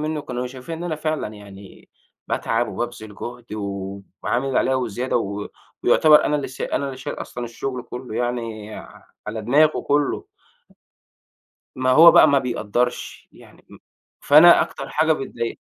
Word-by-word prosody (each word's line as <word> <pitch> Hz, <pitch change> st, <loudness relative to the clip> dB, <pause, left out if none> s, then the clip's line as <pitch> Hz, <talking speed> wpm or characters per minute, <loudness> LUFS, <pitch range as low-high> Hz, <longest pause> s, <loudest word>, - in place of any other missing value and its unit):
منّه 155 Hz, 0 st, -2 dB
كانوا 125 Hz, 0 st, -4 dB
شايفين 130 Hz, +6 st, -8 dB
إن 175 Hz, -, -6 dB
أنا 160 Hz, -3 st, -2 dB
فعلًا 155 Hz, 0 st, -2 dB
يعني 100 Hz, -1 st, -14 dB, 0.4 s
باتعب 115 Hz, +2 st, -1 dB
وبابذل 115 Hz, -3 st, -6 dB
جُهد 120 Hz, +1 st, -8 dB
وعامل 100 Hz, +4 st, -4 dB
اللي 135 Hz, -, +1 dB
عليّا 130 Hz, -, +1 dB
وزيادة 125 Hz, 0 st, -1 dB
و 100 Hz, -2 st, -3 dB, 0.3 s
ويعتبر 155 Hz, -1 st, +5 dB
أنا 150 Hz, -, +1 dB
اللي 145 Hz, -, -4 dB
سا 130 Hz, -, -5 dB
أنا 140 Hz, -, -2 dB
اللي 135 Hz, -1 st, -6 dB
شايل 130 Hz, -, -6 dB
أصلًا 120 Hz, -, -6 dB
الشُغل 125 Hz, +2 st, -5 dB
كُلّه 125 Hz, -1 st, -8 dB
يعني 115 Hz, -3 st, -3 dB, 0.5 s
على 110 Hz, 0 st, -5 dB
دماغه 150 Hz, +7 st, +3 dB
كُلّه. 145 Hz, 0 st, 0 dB, 1.5 s
ما 130 Hz, 0 st, +1 dB
هو 165 Hz, +5 st, +9 dB
بقى 155 Hz, -, +7 dB
ما 140 Hz, -, +4 dB
بيقدّرش، 125 Hz, -1 st, -3 dB
يعني -, -, -18 dB
م -, -, -13 dB, 0.4 s
فأنا 155 Hz, +4 st, +7 dB
أكتر -, -, -7 dB
حاجة 160 Hz, +1 st, +2 dB
بتضايقني 115 Hz, -5 st, -4 dB
125 Hz, 155 wpm, -22 LUFS, 110-145 Hz, 1.5 s, هو